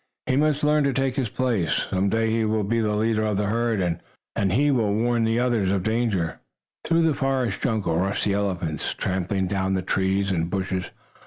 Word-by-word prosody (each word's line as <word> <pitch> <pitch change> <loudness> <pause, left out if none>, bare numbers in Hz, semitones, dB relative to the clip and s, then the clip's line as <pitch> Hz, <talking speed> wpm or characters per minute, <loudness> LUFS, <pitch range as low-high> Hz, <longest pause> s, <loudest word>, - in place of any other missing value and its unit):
"He 130 - +1
must 150 +1 +2
learn 150 0 +3
to 140 - +1
take 135 0 0
his 125 -4 -1
place. 115 -8 0 0.2
Some 95 +1 +1
day 115 +1 +1
he 115 0 +1
will 110 0 0
be 115 +4 0
the 105 -2 0
leader 110 +1 +1
of 105 -2 0
the 105 - 0
herd, 115 +1 0 0.6
and 130 +9 +2
will 105 -4 +1
warn 120 +1 +1
the 115 +1 +1
others 120 -6 +1
of 95 -2 0
danger." 110 -7 0 0.4
Through 165 0 +2
the 160 -2 +3
forest 130 -6 -1
jungle 105 -9 0
rushed 95 +2 0
the 100 - +1
elephants, 90 -7 -2
trampling 95 +1 -1
down 95 0 0
the 95 - -1
trees 95 +1 0
and 85 -2 -1
bushes. 95 -1 -2
105 Hz, 195 wpm, -24 LUFS, 95-120 Hz, 0.6 s, learn